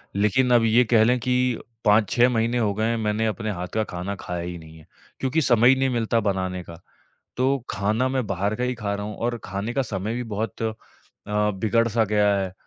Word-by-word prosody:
लेकिन 105 +5 +2
अब 120 -1 +5
ये 115 +3 +5
कह 110 -1 +4
लें 125 +3 +3
कि 125 0 +1 0.3
5-6 110 +4 +4
महीने 115 0 0
हो 110 -4 +1
गए 110 +2 -1
हैं, 115 0 0
मैंने 110 0 0
अपने 110 0 -2
हाथ 90 -2 -5
का 110 - +1
खाना 95 0 -5
खाया 90 -1 -4
ही 90 0 -5
नहीं 80 -1 -13
है, 80 - -16 0.3
क्योंकि 135 +5 0
समय 120 -3 +5
ही 135 - +6
नहीं 135 0 +1
मिलता 115 -2 +1
बनाने 95 -3 -2
का। 85 -1 -11 0.6
तो 135 +2 +2
खाना 105 +6 0
मैं 130 -3 -1
बाहर 100 +2 -1
का 125 - -1
ही 125 0 -1
खा 105 -3 -3
रहा 100 0 -4
हूँ 105 -1 -6
और 120 +1 -2
खाने 100 +5 -4
का 135 - 0
समय 105 -2 -3
भी 125 - -3
बहुत 110 +1 -4
अ, 110 -1 0 0.6
बिगड़ 105 +2 +1
सा 115 0 +2
गया 105 -1 +2
है, 95 -2 -2
110 Hz, 225 wpm, -24 LUFS, 100-120 Hz, 0.6 s, ही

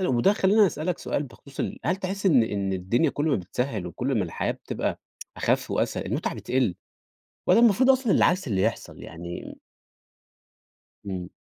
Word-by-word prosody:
وده 195 +12 +4
خلّينا 205 +1 +4
نسألك 170 +1 -2
سؤال 145 - -2
بخصوص 135 +2 -13
ال - - -3
هل 180 +4 +2
تحس 195 +1 -4
إن 135 -11 +6
إن 100 -3 -2
الدنيا 95 - +1
كل 145 - -2
ما 155 - +3
بتسهّل 100 +1 -3
وكل 125 +8 -2
ما 100 - +1
الحياة 80 - -2
بتبقى - - -4 0.4
أخَف - - 0
وأسهل - - -1
المُتعة - - -2
بتقل، 125 -8 0 0.7
والّا 185 +5 +6
المفروض 240 +3 +5
أصلًا 260 -4 +1
العكس 185 -2 +3
اللي 100 -5 0
يحصل؟ - - -2
يعني 85 +1 -7
م - - -28 1.5
إمم. 95 -2 -5
135 Hz, 165 wpm, -26 LUFS, -, 1.5 s, إن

